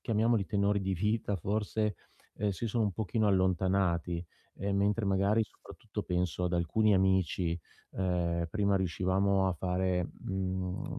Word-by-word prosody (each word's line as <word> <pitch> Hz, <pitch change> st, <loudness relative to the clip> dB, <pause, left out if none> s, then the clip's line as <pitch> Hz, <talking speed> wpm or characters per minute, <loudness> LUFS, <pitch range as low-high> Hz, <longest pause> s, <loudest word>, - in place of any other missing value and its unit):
chiamiamoli 110 Hz, -2 st, +1 dB
tenori 100 Hz, 0 st, +1 dB
di 95 Hz, 0 st, -1 dB
vita 105 Hz, +2 st, 0 dB
forse, 105 Hz, +3 st, -1 dB, 0.4 s
ehm, 105 Hz, -1 st, 0 dB
si 100 Hz, +4 st, -3 dB
sono 115 Hz, 0 st, +1 dB
un 100 Hz, -, 0 dB
pochino 110 Hz, +2 st, 0 dB
allontanati, 95 Hz, -2 st, +1 dB, 0.3 s
e 100 Hz, 0 st, -2 dB
mentre 100 Hz, +2 st, +1 dB
magari, 100 Hz, +3 st, +2 dB
soprattutto -, -, -8 dB
penso 90 Hz, 0 st, -1 dB
ad 90 Hz, -, -1 dB
alcuni 105 Hz, +5 st, +2 dB
amici, 95 Hz, -2 st, +2 dB, 0.3 s
ehm, 85 Hz, -2 st, 0 dB
prima 100 Hz, 0 st, +2 dB
riuscivamo 95 Hz, +2 st, +1 dB
a -, -, +1 dB
fare, 90 Hz, 0 st, -1 dB
mhmm, 95 Hz, -1 st, -3 dB
95 Hz, 135 wpm, -31 LUFS, 90-105 Hz, 0.4 s, magari